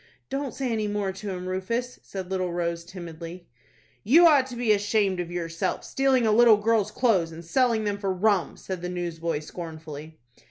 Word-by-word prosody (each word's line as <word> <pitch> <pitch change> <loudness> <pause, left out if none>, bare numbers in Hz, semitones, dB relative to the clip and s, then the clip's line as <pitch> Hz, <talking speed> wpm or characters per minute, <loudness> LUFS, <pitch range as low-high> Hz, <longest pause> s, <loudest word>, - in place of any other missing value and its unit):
"Don't 275 -1 -3
say 265 -3 -2
any 215 -2 0
more 205 -2 -1
to 195 +2 -7
him, 180 -1 -5
Rufus," 230 +7 -3
said 190 -1 -7
little 185 -2 -1
Rose, 170 -1 -2
timidly. 170 -1 -9 0.6
"You 315 - +7
ought 285 -5 +6
to 250 - -8
be 235 -2 +1
ashamed 205 -2 +2
of 175 -1 -3
yourself, 165 -2 -2
stealing 265 -3 +2
a 220 - +3
little 225 0 +7
girl's 215 -1 +2
clothes, 210 -8 +2
and 165 +1 -10
selling 235 +3 +2
them 205 -1 -2
for 195 -2 -1
rum," 190 -3 +1
said 185 -2 -6
the 180 - -3
newsboy, 170 -2 -2
scornfully. 155 -1 -8
190 Hz, 185 wpm, -26 LUFS, 170-225 Hz, 0.6 s, You